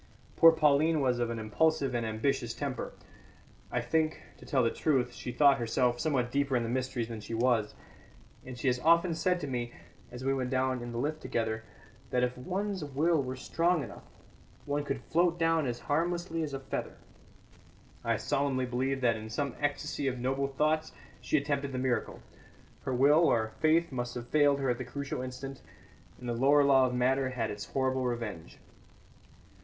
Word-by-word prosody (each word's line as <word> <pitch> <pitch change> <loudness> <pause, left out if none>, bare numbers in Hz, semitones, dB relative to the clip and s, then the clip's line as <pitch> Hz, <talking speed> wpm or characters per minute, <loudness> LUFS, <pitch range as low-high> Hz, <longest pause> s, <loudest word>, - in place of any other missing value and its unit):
Poor 165 - +8
Pauline 155 0 +3
was 125 -3 +1
of 120 -1 0
an 115 - -3
impulsive 135 +5 +1
and 120 -1 0
ambitious 120 +2 -1
temper. - - -4 0.8
I - - 0
think, 160 -1 0 0.2
to - - -14
tell 135 -4 +2
the 115 - +2
truth, 125 -5 0
she 125 - -6
thought 140 +2 +5
herself 120 +1 +1
somewhat 130 -6 0
deeper 140 -1 +1
in 120 - 0
the 115 - -3
mysteries 125 -2 -2
than 115 -2 -6
she 115 - -5
was; 115 -3 +1 0.7
and 130 -1 -8
she 120 - -7
has 125 -1 +2
often 170 +3 +4
said 180 +2 +1
to 145 - -3
me, 120 -2 -3 0.4
as 125 +1 -8
we 135 - +2
went 130 -2 -1
down 130 -1 0
in 120 0 -6
the 120 - -5
lift 155 +5 -2
together, 110 -1 -2 0.5
that 125 0 +1
if 125 0 0
one's 190 +6 -3
will 150 +3 +1
were 130 -1 -4
strong 165 +4 +1
enough, - - -9 0.6
one 145 0 -1
could 135 -3 -4
float 170 +1 +2
down 165 -3 +2
as 120 -1 -4
harmlessly 170 +2 -1
as 145 -3 -3
a - - -4
feather. 135 - -5 1.1
I - - +1
solemnly 135 -2 0
believe 130 +2 -1
that 115 -3 +3
in 110 0 -8
some 140 +3 -2
ecstasy 145 -1 -1
of 130 -1 -1
noble 135 +3 0
thoughts 155 +3 0 0.3
she - - +1
attempted 140 -1 -1
the - - -2
miracle. 125 -1 -1 0.6
Her 130 - -1
will, 140 +5 +5
or 110 -1 +1
faith, 160 +1 +3
must 120 -2 -4
have 120 -1 -6
failed 145 -2 +4
her 135 -2 +2
at 120 - -3
the - - -2
crucial 140 +2 -4
instant, 130 +1 -7 0.6
and 125 - -8
the 120 - -1
lower 140 +5 +4
law 135 -2 +5
of 125 - -3
matter 130 +2 +2
had 120 -4 -2
its 105 -1 -6
horrible 130 -1 0
revenge. 115 -9 -4
130 Hz, 190 wpm, -30 LUFS, 125-145 Hz, 1.1 s, Poor